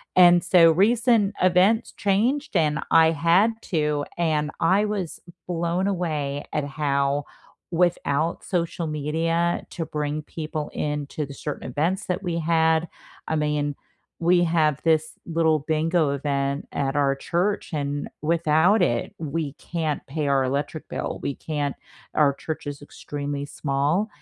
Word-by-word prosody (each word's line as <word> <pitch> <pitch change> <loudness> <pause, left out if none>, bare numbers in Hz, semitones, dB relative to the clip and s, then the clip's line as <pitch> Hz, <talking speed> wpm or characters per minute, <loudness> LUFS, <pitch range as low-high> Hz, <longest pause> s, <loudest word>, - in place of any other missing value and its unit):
And 175 -1 +7
so 170 -2 +6
recent 215 +2 +3
events 185 +5 +3
changed 230 +7 0
and 150 -3 +2
I 160 0 +6
had 170 +8 +3
to, 150 -3 0
and 155 -3 0
I 190 +5 +3
was 200 -6 -3 0.3
blown 175 +2 -1
away 150 -7 -2
at 150 -2 0
how 140 -1 0 0.5
without 165 -2 0
social 170 -2 -2
media 165 +3 -1
to 165 - -3
bring 150 0 -3
people 155 0 -5
into 150 0 -3
the 140 - -9
certain 145 -2 -6
events 170 - -1
that 180 +2 -2
we 170 -2 -2
had 160 0 +2 0.4
I 160 - 0
mean, 150 -1 0 0.5
we 175 +1 +4
have 155 -4 +2
this 160 -1 +2
little 160 -2 +2
bingo 155 0 +1
event 140 0 -2
at 135 0 -1
our 140 -1 +2
church, 180 +5 -1
and 145 -1 -2
without 165 +5 +3
it, 120 -7 0
we 155 -2 -3
can't 160 -2 -3
pay 150 +1 -2
our 135 -1 +3
electric 140 +4 -3
bill, - - -4
we 140 - -1
can't 145 -3 -3 0.4
Our 145 -2 +4
church 155 -1 -6
is 145 -1 -5
extremely 145 0 -5
small, 145 +9 0
160 Hz, 140 wpm, -24 LUFS, 145-175 Hz, 0.5 s, And